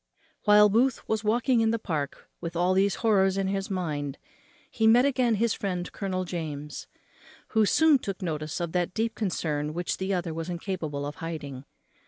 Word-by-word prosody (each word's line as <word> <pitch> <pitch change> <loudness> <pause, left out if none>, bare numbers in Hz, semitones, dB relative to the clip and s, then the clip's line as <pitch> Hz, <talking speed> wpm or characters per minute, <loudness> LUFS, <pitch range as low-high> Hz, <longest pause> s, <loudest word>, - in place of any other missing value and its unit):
While 210 0 +7
Booth 235 +5 +1
was 220 0 -1
walking 235 +3 +2
in 225 - +3
the 230 - +1
Park 155 -10 -4
with 170 0 -5
all 180 +2 +2
these 195 +1 +2
horrors 195 -3 +4
in 195 -1 0
his 195 0 -2
mind 150 -7 -3 0.5
he 225 - 0
again 245 +1 +4
met - - 0
his 230 -1 +2
friend 180 -3 -3
Colonel 185 -2 -3
James, 150 -4 -5 0.6
who 220 -2 +3
soon 315 +1 +5
took 195 -5 -5
notice 155 -2 -3
of 170 -2 -2
that 180 0 -1
deep 225 +1 0
concern 155 -8 -2
which 175 0 -2
the 190 +1 -2
other 175 -3 -1
was 165 +2 -5
incapable 170 -5 -3
of 145 +1 -6
hiding. 145 -5 -6
185 Hz, 180 wpm, -27 LUFS, 160-220 Hz, 0.6 s, While